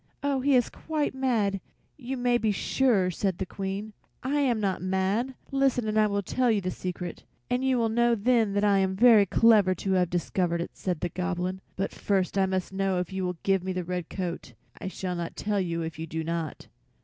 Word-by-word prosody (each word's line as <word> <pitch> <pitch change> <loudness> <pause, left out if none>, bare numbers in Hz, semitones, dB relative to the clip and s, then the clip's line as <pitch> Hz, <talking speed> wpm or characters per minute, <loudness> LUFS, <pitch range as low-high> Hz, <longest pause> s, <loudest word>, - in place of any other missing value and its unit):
"Oh, 280 -1 +1
he 275 +1 +3
is 245 -2 +2
quite 310 -2 -2
mad, 225 -7 0 0.3
you 265 -1 -5
may 245 -1 +2
be 220 -2 +1
sure!" 205 -3 +2
said 190 +1 -1
the 190 - -2
Queen. 195 +3 -5 0.3
"I 280 +3 0
am 250 -6 +2
not 195 -3 -1
mad. 190 +7 0 0.2
Listen 270 -4 +1
and 215 - -1
I 215 -1 +4
will 200 -1 -1
tell 250 +6 +1
you 220 -2 +3
the 185 -1 -3
secret, 180 -2 -5 0.3
and 250 +1 +1
you 265 -1 +2
will 230 -1 +2
know 235 +1 +3
then 220 -2 +2
I 200 -1 +4
am 190 0 +1
very 220 -2 +6
clever 210 -3 +5
to 190 +2 -3
have 180 -2 +2
discovered 175 0 0
it," 170 - -4
said 180 -4 -3
the 175 - -1
Goblin. 185 +1 -3
"But 195 +1 -2
first 195 -2 0
I 195 -1 +3
must 190 0 -2
know 195 -1 0
if 180 +1 -3
you 190 0 -2
will 180 -1 -4
give 195 -2 +2
me 190 0 -2
the 180 0 -2
red 180 -1 -4
coat. 175 -9 -5 0.3
I - - -5
shall 185 -1 -4
not 170 -1 -4
tell 205 -1 -1
you 170 -2 -2
if 160 -1 -6
you 160 - -4
do 160 +1 -3
not." 165 -2 -4
195 Hz, 220 wpm, -27 LUFS, 180-235 Hz, 0.3 s, very